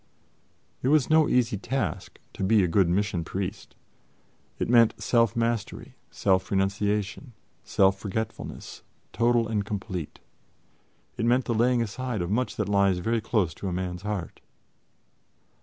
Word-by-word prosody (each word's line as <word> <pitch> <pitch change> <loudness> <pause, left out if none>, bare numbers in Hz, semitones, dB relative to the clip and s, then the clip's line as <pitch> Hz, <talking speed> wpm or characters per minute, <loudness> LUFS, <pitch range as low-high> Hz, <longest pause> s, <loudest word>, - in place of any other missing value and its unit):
It - - -1
was 150 -1 +3
no 155 -1 +5
easy 120 -4 +2
task 135 +6 -3 0.2
to - - -5
be 105 +1 +4
a - - +2
good 90 +1 +3
Mission 95 -1 0
Priest. 95 +3 -5 0.8
It - - -2
meant 115 -2 +4
self 115 -3 +2
mastery, 115 -2 -2 0.2
self 95 -1 +1
renunciation, 100 +5 -1 0.3
self 95 0 +2
forgetfulness 110 +2 -5 0.3
total 120 +1 +2
and 105 -2 -1
complete. 95 -5 -5 1.0
It 115 - -1
meant 125 +2 +3
the 120 - -1
laying 120 +1 +2
aside 115 -2 -3
of 85 - -4
much 125 +4 0
that 105 - -2
lies 100 -2 +3
very 115 +5 -1
close 105 -7 0
to 100 - -6
a 90 - -2
man's 90 -1 -4
heart. 105 -4 -5
105 Hz, 140 wpm, -26 LUFS, 95-115 Hz, 1.0 s, no